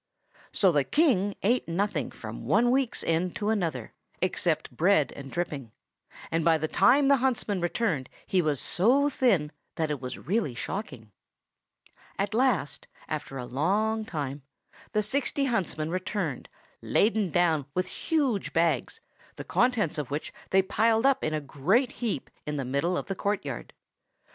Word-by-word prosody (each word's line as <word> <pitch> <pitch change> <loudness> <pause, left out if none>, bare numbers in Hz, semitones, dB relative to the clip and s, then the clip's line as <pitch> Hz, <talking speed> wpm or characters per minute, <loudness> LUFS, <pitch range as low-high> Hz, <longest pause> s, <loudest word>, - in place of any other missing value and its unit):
So 190 -3 +4
the 145 -3 +3
King 205 - +2
ate 240 +6 +2
nothing 195 +5 -1
from - - -8
one 240 +2 +4
week's 260 -2 0
end 165 +2 0
to 210 0 -1
another, 180 -7 -2 0.3
except 175 -3 0
bread 170 -4 +3
and 135 -1 -9
dripping; 145 -9 -3 0.6
and 165 0 +1
by 165 0 +4
the 155 0 -2
time 260 - +4
the 280 0 +6
huntsmen 235 -7 0
returned 175 - -1 0.2
he 185 - +2
was 150 -4 0
so 270 +10 +3
thin 195 - +2 0.2
that 160 -2 -1
it 145 -3 -3
was 125 -1 -5
really 190 - -1
shocking. 130 - -6 1.1
At 200 +1 -1
last, 235 - +1 0.2
after 145 -3 -4
a 125 - -4
long 205 - 0
time, 145 -8 -4 0.5
the 215 - +1
sixty 275 +5 0
huntsmen 175 - -1
returned, 185 - -3 0.3
laden 215 -2 +2
down 160 -4 +2
with 185 0 +1
huge 280 - -1
bags, 170 - +1 0.3
the - - -7
contents 230 -11 +1
of 140 -4 -4
which 145 +2 -4 0.2
they 190 0 +4
piled 225 +4 +2
up 270 -1 +3
in 155 0 0
a - - 0
great 155 - +1
heap 215 - -2 0.2
in 150 0 -2
the 135 - -2
middle 140 +8 0
of - - -3
the 195 - -3
courtyard. 200 +1 -3
185 Hz, 155 wpm, -28 LUFS, 155-225 Hz, 1.1 s, the